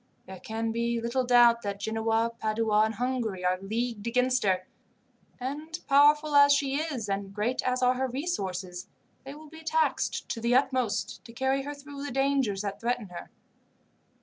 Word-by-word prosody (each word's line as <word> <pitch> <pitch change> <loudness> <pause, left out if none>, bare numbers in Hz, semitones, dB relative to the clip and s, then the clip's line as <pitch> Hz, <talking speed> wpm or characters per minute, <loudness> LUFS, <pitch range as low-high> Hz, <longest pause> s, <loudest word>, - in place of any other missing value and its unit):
There 190 -1 -10
can 225 +2 -3
be 235 +1 -1
little 235 +3 -1
doubt 240 -1 +5
that 200 -2 -4
Genoa, 225 +2 0
Padua, 215 -1 +2
and 220 0 -3
Hungary 235 -6 -2
are 185 +1 +1
leagued 225 +2 -3
against 250 +2 +2
her; 185 -2 +1 0.7
and 300 +6 -5
powerful 295 +2 +5
as 285 0 +7
she 280 -1 +1
is, 290 -8 -3
and 195 0 -3
great 215 +5 -1
as 255 0 -1
are 250 0 +4
her 260 +1 -1
resources, 190 - -4 0.4
they 275 +1 -8
will 305 0 -13
be 320 0 -11
taxed 475 +9 0
to 230 - -3
the 235 +1 +2
utmost 260 -4 0
to 230 - -12
carry 265 +2 0
her 290 +2 -6
through 285 0 -9
the 290 - -4
dangers 270 -6 +1
that 200 -1 -4
threaten 235 -3 -2
her. 175 - -9
240 Hz, 175 wpm, -28 LUFS, 215-275 Hz, 0.7 s, as